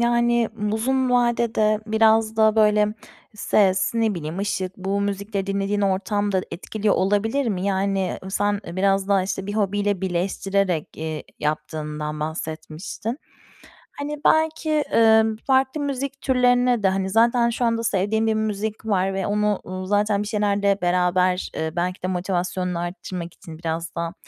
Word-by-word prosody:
yani 235 Hz, -1 st, +2 dB, 0.2 s
uzun 260 Hz, +3 st, +1 dB
vadede 235 Hz, -3 st, +2 dB
biraz 220 Hz, 0 st, +3 dB
da 220 Hz, 0 st, +4 dB
böyle 210 Hz, -1 st, +4 dB, 0.5 s
ses, 195 Hz, 0 st, +2 dB
ne 225 Hz, -3 st, +1 dB
bileyim 160 Hz, +1 st, -5 dB
ışık 190 Hz, -2 st, -2 dB
bu 195 Hz, +1 st, -2 dB
müzikleri 200 Hz, 0 st, -2 dB
dinlediğin 200 Hz, +1 st, -1 dB
ortam 200 Hz, +1 st, 0 dB
da 190 Hz, -, +2 dB
etkiliyor 210 Hz, +3 st, -1 dB
olabilir 215 Hz, +8 st, +1 dB
mi? 190 Hz, -3 st, -1 dB
Yani 195 Hz, -1 st, 0 dB
sen 205 Hz, +1 st, 0 dB
biraz 195 Hz, +2 st, +1 dB
daha, 195 Hz, -2 st, +3 dB
işte, 190 Hz, 0 st, -4 dB
bir 205 Hz, -, -4 dB
hobiyle 205 Hz, -1 st, 0 dB
birleştirerek, 190 Hz, -1 st, -1 dB
eee, 155 Hz, -1 st, -4 dB, 0.2 s
yaptığından 150 Hz, 0 st, -3 dB
bahsetmiştin. 160 Hz, -, -5 dB, 0.7 s
Hani 295 Hz, +1 st, -5 dB
belki, 315 Hz, -1 st, +2 dB
ımm, 220 Hz, -1 st, +5 dB
farklı 265 Hz, +2 st, +2 dB
müzik 275 Hz, 0 st, -3 dB
türlerine 245 Hz, -3 st, +3 dB
de, -, -, +5 dB
hani, 190 Hz, 0 st, -1 dB
zaten 235 Hz, +3 st, +3 dB
şu 240 Hz, +1 st, -1 dB
anda 230 Hz, 0 st, 0 dB
sevdiğin 220 Hz, +2 st, +1 dB
bir 220 Hz, -, +2 dB
müzik 215 Hz, 0 st, -2 dB
var 195 Hz, -2 st, +1 dB
ve 190 Hz, 0 st, -2 dB
onu, 210 Hz, 0 st, +1 dB
uuu, 185 Hz, +1 st, -6 dB
zaten 205 Hz, +1 st, +1 dB
bir -, -, -6 dB
şeylerde 200 Hz, -2 st, +1 dB
beraber, 180 Hz, +1 st, +1 dB
ııı, 160 Hz, 0 st, -3 dB
belki 180 Hz, +2 st, -2 dB
de -, -, 0 dB
motivasyonunu 180 Hz, -1 st, -2 dB
arttırmak 175 Hz, 0 st, -5 dB
için, 160 Hz, -2 st, -11 dB
biraz 165 Hz, 0 st, -4 dB
da 170 Hz, 0 st, -3 dB
200 Hz, 145 wpm, -23 LUFS, 185-225 Hz, 0.7 s, ımm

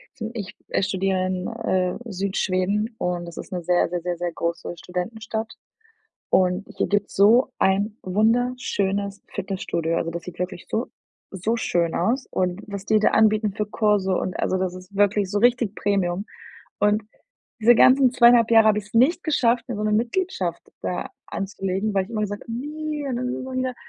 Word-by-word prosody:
zum 225 Hz, -3 st, -5 dB
ich, 205 Hz, -5 st, -6 dB
äh, -, -, +1 dB
studiere 190 Hz, -1 st, 0 dB
in, 185 Hz, -1 st, -2 dB
äh, 190 Hz, -6 st, -1 dB
Südschweden 200 Hz, +2 st, -1 dB
und 175 Hz, -1 st, -2 dB
das 170 Hz, -, -10 dB
ist -, -, -8 dB
'ne 180 Hz, -2 st, -3 dB
sehr, 175 Hz, +1 st, +2 dB
sehr, 175 Hz, 0 st, -3 dB
sehr, 175 Hz, 0 st, -3 dB
sehr 175 Hz, 0 st, -2 dB
große 170 Hz, +1 st, -3 dB
Studentenstadt 220 Hz, +5 st, -4 dB, 0.8 s
und 185 Hz, +1 st, +2 dB
hier -, -, +1 dB
gibt's 205 Hz, 0 st, -1 dB
so 230 Hz, +7 st, +5 dB
ein 205 Hz, +3 st, +1 dB
wunderschönes 205 Hz, -2 st, 0 dB
Fitnessstudio. 170 Hz, -4 st, -2 dB
Also, 165 Hz, -, -1 dB
das 170 Hz, 0 st, -6 dB
sieht 180 Hz, 0 st, -10 dB
wirklich 180 Hz, -1 st, -4 dB
so 230 Hz, +3 st, -1 dB, 0.4 s
so 195 Hz, +4 st, -1 dB
schön 170 Hz, -6 st, 0 dB
aus 235 Hz, +9 st, 0 dB
und 180 Hz, +2 st, -1 dB
was 200 Hz, -1 st, -6 dB
die 215 Hz, +1 st, +3 dB
da 210 Hz, -, +4 dB
anbieten 215 Hz, -1 st, +3 dB
für 210 Hz, +1 st, -2 dB
Kurse 210 Hz, -3 st, +1 dB
und 185 Hz, -, -3 dB
also, 185 Hz, -, +1 dB
das 185 Hz, -1 st, -2 dB
ist 185 Hz, +2 st, -12 dB
wirklich 205 Hz, -1 st, +2 dB
so 205 Hz, -, 0 dB
richtig 240 Hz, -2 st, +2 dB
Premium. 195 Hz, -1 st, 0 dB, 0.6 s
Und 210 Hz, +1 st, +3 dB, 0.6 s
diese 235 Hz, +2 st, +7 dB
ganzen 260 Hz, 0 st, +6 dB
2,5 240 Hz, -2 st, +6 dB
Jahre 225 Hz, -1 st, +7 dB
habe 210 Hz, -1 st, +3 dB
ich's 205 Hz, 0 st, -8 dB
nicht 280 Hz, +10 st, +3 dB
geschafft, 245 Hz, -6 st, +2 dB
mir 245 Hz, -, -3 dB
so 210 Hz, -, -3 dB
'ne 215 Hz, -, +1 dB
Mitgliedschaft 230 Hz, -, -1 dB, 0.2 s
da 180 Hz, -, -3 dB, 0.2 s
anzulegen, 195 Hz, +1 st, -3 dB
weil 195 Hz, -1 st, +2 dB
ich 190 Hz, -, -15 dB
immer 220 Hz, -2 st, -2 dB
gesagt 205 Hz, 0 st, -3 dB
habe: 230 Hz, -, -7 dB
„Ne, 300 Hz, +4 st, -4 dB
dann 260 Hz, -3 st, -2 dB
sind 250 Hz, +1 st, -3 dB
das 260 Hz, -, -6 dB
ja -, -, -1 dB
wieder 255 Hz, -1 st, -1 dB
205 Hz, 185 wpm, -23 LUFS, 185-230 Hz, 0.8 s, diese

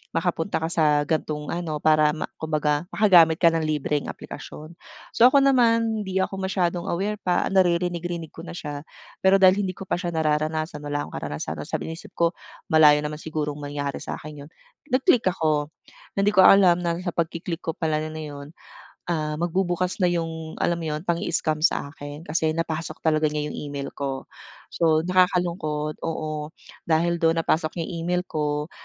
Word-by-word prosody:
makapunta 165 Hz, 0 st, -1 dB
ka 160 Hz, -, -1 dB
sa 150 Hz, -4 st, +3 dB
gan'tong 150 Hz, -1 st, -2 dB
ano, 170 Hz, -3 st, -3 dB
para 155 Hz, -1 st, +4 dB
ma 155 Hz, -, -3 dB
kumbaga, 150 Hz, 0 st, 0 dB
makagamit 175 Hz, -6 st, +6 dB
ka 170 Hz, -2 st, +5 dB
ng 165 Hz, -, 0 dB
libreng 150 Hz, -1 st, -1 dB
aplikasyon. 155 Hz, +2 st, -9 dB, 0.4 s
So, 240 Hz, -, +7 dB
ako 275 Hz, +1 st, +5 dB
naman 230 Hz, -4 st, +3 dB
hindi 190 Hz, 0 st, +1 dB
ako 195 Hz, 0 st, -4 dB
masyadong 185 Hz, -2 st, -1 dB
aware 200 Hz, +4 st, -2 dB
pa, 180 Hz, -3 st, 0 dB
naririnig-rinig 175 Hz, -3 st, 0 dB
ko 165 Hz, -, -10 dB
na -, -, -7 dB
siya, 145 Hz, -4 st, -6 dB, 0.4 s
pero 190 Hz, +1 st, +5 dB
dahil 190 Hz, +1 st, +5 dB
hindi 185 Hz, -2 st, -2 dB
ko 195 Hz, -, -8 dB
pa 175 Hz, -, -1 dB
siya 175 Hz, -, -2 dB
nararanasan 155 Hz, 0 st, 0 dB
wala 145 Hz, 0 st, -2 dB
akong -, -, -13 dB
karanasan 75 Hz, +1 st, -4 dB
tapos 75 Hz, -, -6 dB
sabi 160 Hz, -, -3 dB
inisip 165 Hz, -, -12 dB
ko 170 Hz, 0 st, +2 dB, 0.4 s
malayo 155 Hz, -2 st, +7 dB
naman 150 Hz, 0 st, -4 dB
sigurong 150 Hz, -2 st, -4 dB
mangyari 145 Hz, -1 st, -4 dB
sa -, -, -5 dB
akin 150 Hz, -1 st, -10 dB
yun. -, -, -20 dB, 0.4 s
Nag-click 255 Hz, -1 st, +3 dB
ako 155 Hz, -4 st, 0 dB, 0.5 s
na -, -, +3 dB
hindi 200 Hz, -, +4 dB
ko 190 Hz, -, +7 dB
alam 185 Hz, -3 st, +7 dB
na 170 Hz, -1 st, -1 dB
sa 180 Hz, -, -2 dB
pagki-click 165 Hz, +1 st, -3 dB
ko 165 Hz, -, -1 dB
pala 160 Hz, -3 st, -1 dB
yun, 150 Hz, -1 st, -7 dB, 0.6 s
ah, 155 Hz, -2 st, -1 dB
magbubukas 175 Hz, +2 st, -1 dB
na 185 Hz, -, +3 dB
'yong 165 Hz, -2 st, -2 dB
alam 170 Hz, 0 st, +1 dB
mo 165 Hz, -, -5 dB
'yon, 155 Hz, -, -4 dB
pang-i-scam 170 Hz, -3 st, 0 dB
sa 140 Hz, -3 st, +1 dB
akin 145 Hz, +1 st, -9 dB
kasi 160 Hz, -1 st, 0 dB
napasok 165 Hz, -1 st, -4 dB
talaga 155 Hz, -1 st, +2 dB
niya 150 Hz, 0 st, -2 dB
'yong -, -, -6 dB
email 140 Hz, -1 st, -5 dB
ko. 135 Hz, -1 st, -5 dB, 0.4 s
So, 160 Hz, -1 st, +2 dB
nakakalungkot 175 Hz, -4 st, 0 dB
oo, 155 Hz, -1 st, -4 dB, 0.3 s
dahil 170 Hz, +1 st, +2 dB
do'n 165 Hz, 0 st, +2 dB
napasok 155 Hz, -1 st, 0 dB
niya -, -, -4 dB
email 180 Hz, +2 st, 0 dB
ko, 150 Hz, -1 st, -2 dB
160 Hz, 175 wpm, -24 LUFS, 150-175 Hz, 0.6 s, So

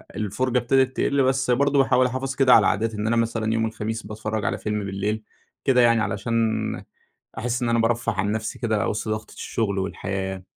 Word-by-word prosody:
الفرجة 125 Hz, +5 st, -1 dB
ابتدت 130 Hz, +2 st, +2 dB
تقِل، 140 Hz, -1 st, +2 dB
بس 130 Hz, -1 st, +1 dB
برضو 140 Hz, +3 st, +2 dB
باحاول 130 Hz, -1 st, +4 dB
أحافظ 130 Hz, +2 st, -2 dB
كده 130 Hz, -2 st, +5 dB
على 110 Hz, -, +6 dB
عادات، 110 Hz, +4 st, 0 dB
إن 105 Hz, 0 st, -3 dB
أنا 115 Hz, -, +2 dB
مثلًا 115 Hz, -1 st, 0 dB
يوم 115 Hz, 0 st, +1 dB
الخميس 110 Hz, 0 st, -4 dB
باتفرّج 110 Hz, 0 st, -4 dB
على -, -, 0 dB
فيلم 105 Hz, -1 st, -3 dB
بالليل 100 Hz, +3 st, -2 dB, 0.4 s
كده 125 Hz, -2 st, +4 dB
يعني، 115 Hz, -1 st, +4 dB
علشان 105 Hz, +3 st, -2 dB, 1.0 s
أحس 120 Hz, +2 st, -2 dB
إن 120 Hz, -, 0 dB
أنا 115 Hz, 0 st, +2 dB
بارفه 115 Hz, +1 st, +1 dB
عن 100 Hz, 0 st, -1 dB
نفسي 110 Hz, 0 st, -3 dB
كده 110 Hz, -4 st, 0 dB
وسط 105 Hz, +1 st, -3 dB
ضغطة 110 Hz, 0 st, -4 dB
الشغل 100 Hz, -4 st, -2 dB
والحياة. 95 Hz, 0 st, -4 dB
115 Hz, 185 wpm, -24 LUFS, 105-125 Hz, 1.0 s, على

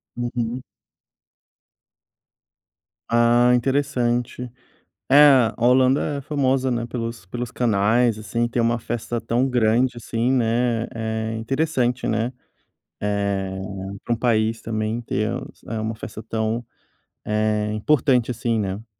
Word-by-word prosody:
Uhum. 120 Hz, 0 st, -3 dB, 2.5 s
Ah, 120 Hz, +1 st, +4 dB
interessante. 125 Hz, -2 st, -1 dB, 0.6 s
É 140 Hz, -, +6 dB, 0.4 s
a -, -, -20 dB
Holanda 130 Hz, +4 st, +3 dB
é -, -, -8 dB
famosa, 135 Hz, -2 st, 0 dB
né, 120 Hz, -1 st, -1 dB
pelos 115 Hz, -4 st, -5 dB
pelos 120 Hz, +5 st, -5 dB
canais, 115 Hz, 0 st, +2 dB
assim, 115 Hz, +2 st, -1 dB
ter 120 Hz, 0 st, -1 dB
uma 115 Hz, 0 st, +1 dB
festa 120 Hz, +1 st, -3 dB
tão 125 Hz, +4 st, 0 dB
grande 120 Hz, +1 st, +2 dB
assim, 120 Hz, +2 st, -1 dB
né, 120 Hz, -1 st, +1 dB
é 110 Hz, 0 st, -3 dB
interessante, 125 Hz, 0 st, 0 dB
né, 115 Hz, +3 st, 0 dB, 0.7 s
eh, 100 Hz, -2 st, -1 dB, 0.4 s
pra 120 Hz, -, 0 dB
um -, -, -2 dB
país 110 Hz, -1 st, +1 dB
também 110 Hz, +1 st, -2 dB
ter, 110 Hz, -2 st, -1 dB, 0.4 s
eh, 115 Hz, -1 st, -3 dB
uma 110 Hz, +1 st, -3 dB
festa 110 Hz, 0 st, -8 dB
tão, 110 Hz, +1 st, -2 dB, 0.6 s
é, 105 Hz, 0 st, 0 dB
importante 125 Hz, +1 st, +2 dB
assim, 115 Hz, -1 st, -1 dB
né. 100 Hz, +3 st, -4 dB
115 Hz, 115 wpm, -22 LUFS, 110-125 Hz, 2.5 s, É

